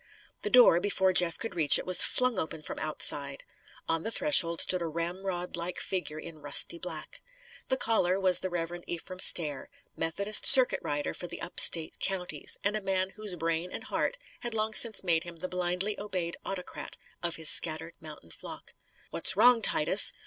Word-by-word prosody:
The 420 - -4
door, 245 - +5
before 190 -1 -1
Jeff 175 -2 +3
could 225 - -5
reach 155 -5 +4
it, - - -8
was 185 -1 +5
flung 250 -5 +1
open 160 -2 -7
from - - -7
outside. 145 -2 0 0.4
On 165 0 -2
the 225 - -4
threshold 185 - 0
stood 185 -1 +2
a 170 - -4
ramrodlike 175 +1 -5
figure 180 -5 -6
in 155 0 -12
rusty 145 - +4
black. - - -7 0.5
The 260 - -1
caller 195 -6 0
was 185 -2 +3
the 185 - -4
Reverend 175 0 -7
Ephraim 180 +2 -8
Stair 150 -7 0 0.3
Methodist 200 +6 +1
circuit 260 -2 +9
rider 145 0 -5
for 175 - -8
the 170 0 -9
up 170 - -5
State 160 -2 +3
counties, 185 -2 -2
and 200 +1 -1
a 215 - -4
man 190 -1 -3
whose 210 -3 -3
brain 165 +1 -4
and - - -8
heart - - -4 0.2
had 240 -2 -5
long 220 0 -3
since 220 -2 +5
made 165 -3 0
him 175 -1 -12
the 165 +3 -7
blindly 180 +3 -3
obeyed 185 -4 -5
autocrat 185 -2 -8 0.2
of 170 -1 -5
his 160 -2 0
scattered 165 +1 +1
mountain 150 - -13
flock. - - -11 0.4
"What's 185 +3 -2
wrong, 240 +2 +4
Titus?" 155 -7 +4
180 Hz, 180 wpm, -27 LUFS, 165-200 Hz, 0.5 s, circuit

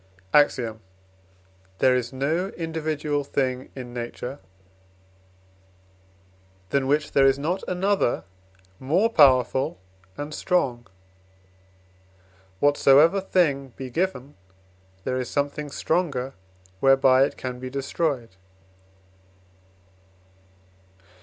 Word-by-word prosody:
AXIOM. 120 -6 +3 1.0
There 130 +3 +4
is 125 -1 -2
no 155 +8 -1
individual 155 -3 -2
thing 130 -2 -2
in 125 -2 -8
nature, 125 +3 -6 2.3
than 140 -1 0
which 150 +1 +1
there 135 -1 +5
is 135 0 +3
not 170 +7 -2
another 190 -5 0 0.6
more 180 +12 +1
powerful 130 - +4 0.4
and 145 +1 -6
strong. 125 -12 -1 1.7
Whatsoever 145 +5 +5
thing 140 -9 0
be 130 -1 -7
given, 145 -4 -2 0.7
there 130 0 -2
is 125 -1 -4
something 145 +1 -2
stronger 140 -4 -1 0.5
whereby 135 0 +5
it - - -6
can 125 -1 -5
be 130 0 -6
destroyed. 135 - -3
140 Hz, 90 wpm, -24 LUFS, 130-155 Hz, 2.3 s, there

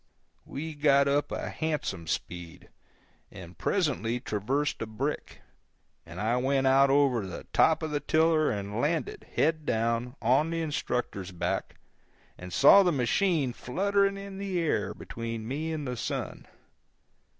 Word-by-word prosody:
We 160 +3 -5
got 140 -2 +4
up 145 +1 +1
a - - -4
handsome 150 - -3
speed, 85 0 -5 0.6
and 90 -1 -11
presently 125 - 0
traversed 130 +6 -2
a 115 - -3
brick, 130 +7 -4 0.6
and 85 +2 -9
I 115 +3 +1
went 135 +1 +1
out 135 +1 +5
over 135 -7 +3
the 90 - -8
top 160 0 +4
of 155 - -3
the 145 - 0
tiller 155 +1 +3
and 105 +2 -3
landed, 155 -1 -2
head 155 +1 +2
down, 115 0 -1
on 135 +7 +2
the 165 0 -2
instructor's 125 - -3
back, 90 - -3 0.6
and 90 0 -10
saw 150 - +7
the 180 -2 +3
machine 140 - +1
fluttering 200 +9 0
in 195 -1 -8
the 195 -3 -2
air 165 -2 0
between 115 -1 -6
me 155 +6 -3
and 150 -3 -4
the 125 - -3
sun. - - -4
140 Hz, 145 wpm, -28 LUFS, 115-160 Hz, 0.6 s, saw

